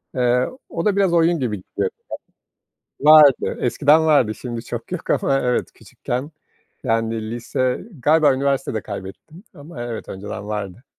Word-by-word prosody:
eee, 125 0 +2 0.2
o 165 - -4
da 210 -2 +2
biraz 195 -3 +2
oyun 170 0 +3
gibi 115 -6 -2
gidiyordu. - - -3 1.1
Vardı, 150 -2 +6
eskiden 145 +5 +3
vardı. 130 -8 +3
Şimdi 120 -1 -6
çok 120 +7 -7
yok 180 - -5
ama 135 0 +2
evet, 125 0 -1
küçükken... 130 +5 -6 0.5
Yani 115 -1 -1
lise... 125 +3 -2 0.2
Galiba 155 0 +4
üniversitede 135 -4 -1
kaybettim 105 - -9
ama 145 -5 -9
evet, 120 -2 -6
önceden 100 +1 -7
vardı. 105 +2 -5
125 Hz, 135 wpm, -21 LUFS, 115-155 Hz, 1.1 s, Vardı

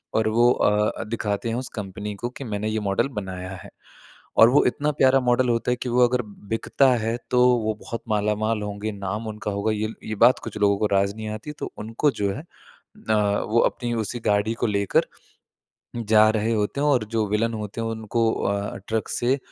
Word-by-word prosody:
और 110 0 +2
वो 120 +2 +4
अ, 105 -2 +2
अ, - - -2
दिखाते 110 0 -2
हैं 115 - -1
उस 125 0 -3
कंपनी 105 0 -5
को 120 +5 -4
कि, 135 - -9
"मैंने 105 -2 -3
ये 110 0 -1
मॉडल 100 - +1
बनाया 95 -1 -6
है।" - - -11 0.7
और 115 - +8
वो 140 - +5
इतना 150 +4 +1
प्यारा 135 0 +6
मॉडल 125 0 +2
होता 120 +1 +1
है - - +2
कि 125 - -2
वो 125 +1 +5
अगर 125 0 0 0.3
बिकता 130 +4 +2
है, 115 +1 -1
तो 125 0 +4 0.2
वो 110 0 -1
बहुत 115 - -6
मालामाल 105 +1 0
होंगे, 105 +1 -4
नाम 100 +2 -4
उनका 105 -1 -4
होगा। 100 +2 -1
ये 110 +1 -1 0.2
ये 110 - -4
बात 125 - +5
कुछ - - -6
लोगों 100 -1 +3
को 105 - +1
राज़ 100 +1 +1
नहीं 110 -1 -6
आती 110 +7 -6
तो - - -5
उनको 115 +7 0
जो 100 -1 +1
है 145 - -7 0.7
अ, - - +4 0.4
वो 115 +2 +3
अपनी 120 -1 -1
उसी 120 +3 -5
गाड़ी 105 +1 +2
को - - +3
लेकर 100 -1 +1 0.9
जा 110 -1 +4
रहे 110 +1 0
होते 105 +5 -1
हैं 150 - +2
और 130 -6 +3
जो 110 - +2
विलन 115 +2 0
होते 105 +1 -5
हैं, 115 - -2
उनको 115 0 0
अ, 100 0 -2
ट्रक 110 0 -1
से 130 +3 +1
110 Hz, 210 wpm, -24 LUFS, 105-120 Hz, 0.9 s, और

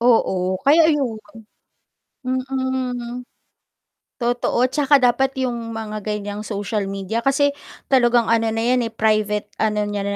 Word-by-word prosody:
Oo, 190 -6 +2
kaya 315 +3 +5
ayun. 275 -8 0 1.1
Mm. 255 -1 -3 0.9
Totoo, 245 +1 +1
tsaka 285 +1 +3
dapat 255 +2 +2
yung 235 -3 -3
mga 215 -1 -5
ganiyang 210 -1 -4
social 205 0 -3
media 195 +3 -3
kasi 285 +1 +3 0.4
talagang 240 -3 +3
ano 230 0 +2
na 225 - -1
yan 250 0 +2
eh, 225 - -5
private 215 -1 0
ano 210 -1 +1
niya 205 -1 -3
235 Hz, 125 wpm, -21 LUFS, 215-260 Hz, 1.1 s, kaya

